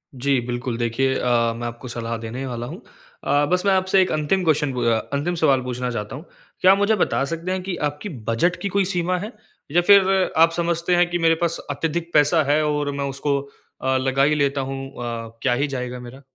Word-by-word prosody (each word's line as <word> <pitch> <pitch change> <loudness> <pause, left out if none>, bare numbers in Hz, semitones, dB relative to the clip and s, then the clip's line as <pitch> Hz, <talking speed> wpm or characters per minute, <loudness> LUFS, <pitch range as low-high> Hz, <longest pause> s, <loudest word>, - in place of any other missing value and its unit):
जी, 135 +1 +1
बिल्कुल। 120 -1 -3
देखिए 120 +3 0
अ, 120 -2 +2
मैं 120 +1 -4
आपको 120 +2 -8
सलाह 115 -1 -4
देने 115 +4 -6
वाला 120 -1 -4
हूँ, 175 - -8 0.4
अ, 145 +1 +2
बस 180 0 +2
मैं 200 - +4
आपसे 190 0 +3
1 185 - +1
अंतिम 155 +5 0
क्वेस्चन 150 -4 +1
पू 125 - -3
अ 115 -1 +3 0.2
अंतिम 150 +5 -1
सवाल 140 -6 +3
पूछना 125 0 -3
चाहता 105 0 -5
हूँ। 150 +6 -9 0.4
क्या 185 - +7
आप 195 - +4
मुझे 205 +2 +2
बता 180 - +1
सकते 170 +3 -4
हैं 185 0 -1
कि 185 -1 -3
आपकी 150 +8 -8 0.2
बजट 170 +11 +2
की - - -1
कोई 195 - +3
सीमा 180 -1 0
है? 210 +5 -6 0.4
या 175 +3 +4
फ़िर 195 0 +4
आप 165 +1 +6
समझते 170 +1 0
हैं 175 0 +3
कि 175 - -1
मेरे 165 -1 +4
पास 170 -1 0
अत्यधिक 165 +4 -3
पैसा 150 +2 +4
है 155 +1 +3
और 150 -1 0
मैं 140 0 -3
उसको 140 +1 -1 0.4
अ, 130 0 +1
लगा 135 +1 +1
ही 150 +2 +3
लेता 140 -1 +1
हूँ 135 0 -5
अ, 115 -1 -6
क्या - - +3
ही 140 +4 0
जाएगा 125 -2 -5
मेरा? 125 +2 -11
145 Hz, 225 wpm, -22 LUFS, 125-175 Hz, 0.4 s, क्या